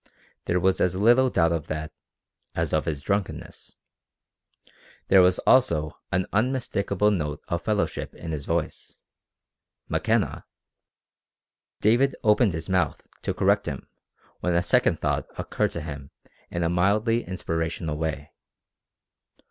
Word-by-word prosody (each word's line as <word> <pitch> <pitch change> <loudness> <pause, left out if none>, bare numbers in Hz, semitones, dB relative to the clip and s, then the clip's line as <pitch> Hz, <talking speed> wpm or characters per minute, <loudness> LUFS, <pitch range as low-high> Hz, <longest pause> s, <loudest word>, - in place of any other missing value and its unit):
There 90 - +1
was 95 +1 +2
as 90 0 +2
little 120 +6 +4
doubt 85 -7 +2
of 85 -1 -2
that 75 0 -4 0.6
as 85 -2 -1
of 80 - +1
his 75 -4 -3
drunkenness. 100 +1 -4 1.3
There 95 -1 +7
was 90 0 +4
also 85 -13 +3
an 95 +1 +1
unmistakable 105 -4 +1
note 75 -7 -2
of 85 -2 -1
fellowship 105 +1 -2
in 80 - -7
his 75 -3 -4
voice. 85 -2 -3 0.9
McKenna! - - 0 1.3
David 120 +6 +3
opened 105 -2 +4
his 80 - -5
mouth 90 -6 0 0.2
to - - -2
correct - - +2
him - - -5 0.5
when 90 -1 0
a 85 - +2
second 85 - +2
thought - - -1
occurred - - -1
to 85 - -4
him 70 -3 -7 0.4
in 85 - -2
a 85 - +1
mildly 105 +7 +2
inspirational 80 -3 -3
way. 75 -2 -4
90 Hz, 130 wpm, -25 LUFS, 80-105 Hz, 1.3 s, There